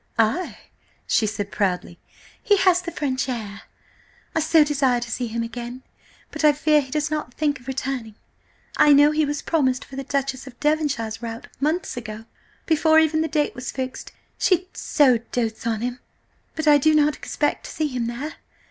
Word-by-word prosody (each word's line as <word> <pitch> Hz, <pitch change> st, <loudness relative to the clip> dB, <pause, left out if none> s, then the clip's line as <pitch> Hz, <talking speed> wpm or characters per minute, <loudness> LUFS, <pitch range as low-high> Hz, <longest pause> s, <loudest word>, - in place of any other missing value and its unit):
"Ay!" 225 Hz, +11 st, +1 dB, 0.5 s
she 220 Hz, -, +2 dB
said 205 Hz, -1 st, -4 dB
proudly. 180 Hz, -3 st, -1 dB, 0.4 s
"He 415 Hz, -4 st, +3 dB
has 370 Hz, -2 st, +4 dB
the 360 Hz, -, -5 dB
French 270 Hz, -3 st, -2 dB
air.... 210 Hz, -5 st, -5 dB, 0.7 s
I -, -, +1 dB
so 315 Hz, 0 st, +5 dB
desire 275 Hz, -4 st, +1 dB
to 235 Hz, -1 st, -6 dB
see 245 Hz, +1 st, -2 dB
him 230 Hz, +1 st, -2 dB
again, 240 Hz, +2 st, -7 dB, 0.5 s
but -, -, -5 dB
I 300 Hz, -1 st, +7 dB
fear 300 Hz, 0 st, +3 dB
he 265 Hz, -, -10 dB
does 300 Hz, +2 st, -1 dB
not 300 Hz, -5 st, -3 dB
think 290 Hz, -3 st, 0 dB
of 250 Hz, -, -19 dB
returning. 260 Hz, -4 st, -3 dB, 0.6 s
I 295 Hz, -, +7 dB
know 290 Hz, +1 st, +6 dB
he 305 Hz, 0 st, +2 dB
was 290 Hz, 0 st, -3 dB
promised 260 Hz, -6 st, +1 dB
for 270 Hz, -, -11 dB
the 275 Hz, -, -4 dB
Duchess 275 Hz, -1 st, -2 dB
of 245 Hz, -2 st, -12 dB
Devonshire's 280 Hz, -8 st, 0 dB
rout 230 Hz, 0 st, -7 dB
months 310 Hz, +1 st, -1 dB
ago–before 245 Hz, +8 st, -1 dB
even 315 Hz, 0 st, +4 dB
the 320 Hz, -, 0 dB
date 300 Hz, -2 st, 0 dB
was 250 Hz, 0 st, -5 dB
fixed, 260 Hz, -1 st, -5 dB, 0.3 s
she 365 Hz, -1 st, +2 dB
so 255 Hz, -5 st, +3 dB
dotes 225 Hz, -2 st, -2 dB
on 225 Hz, -1 st, -1 dB
him–but 250 Hz, +5 st, -7 dB
I 295 Hz, -1 st, +7 dB
do 310 Hz, +2 st, +4 dB
not 300 Hz, 0 st, +3 dB
expect 295 Hz, +10 st, -2 dB
to -, -, -7 dB
see 315 Hz, -, -1 dB
him 245 Hz, -3 st, -2 dB
there." 265 Hz, +7 st, -5 dB
275 Hz, 180 wpm, -23 LUFS, 235-305 Hz, 0.7 s, I